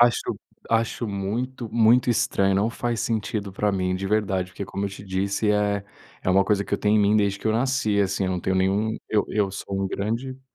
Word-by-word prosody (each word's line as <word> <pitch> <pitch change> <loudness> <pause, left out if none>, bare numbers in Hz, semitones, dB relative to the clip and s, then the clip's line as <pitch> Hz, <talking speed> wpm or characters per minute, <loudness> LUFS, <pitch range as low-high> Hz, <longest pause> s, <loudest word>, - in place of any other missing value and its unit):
Acho 120 0 +3 0.3
acho 115 +1 +1
muito 115 +5 -3
muito 120 +2 +4
estranho. 100 -3 +2
Não 105 +4 +2
faz 120 -1 -2
sentido 105 -3 -2
pra 105 +1 0
mim, 90 -1 0
de 95 +1 -4
verdade, 95 -3 0
porque, 100 - -5
como 100 +1 -4
eu - - -3
te 100 - -9
disse, 100 +3 0
eh, 105 -1 +1 0.4
é 95 - +1
uma 95 +1 +4
coisa 100 -1 +1
que - - -1
eu - - -2
tenho 105 +1 +3
em - - +4
mim 105 +1 +4
desde 100 -1 +1
que - - -5
eu 110 - +3
nasci, 115 -4 +1
assim, 100 0 0
eu 95 - 0
não 90 -1 -1
tenho 95 +2 0
nenhum. 100 +4 +1
Eu 105 -1 +2
eu 105 -2 +1
sou 100 0 -4
um 95 - -1
grande 120 +7 -3
105 Hz, 230 wpm, -24 LUFS, 95-110 Hz, 0.4 s, muito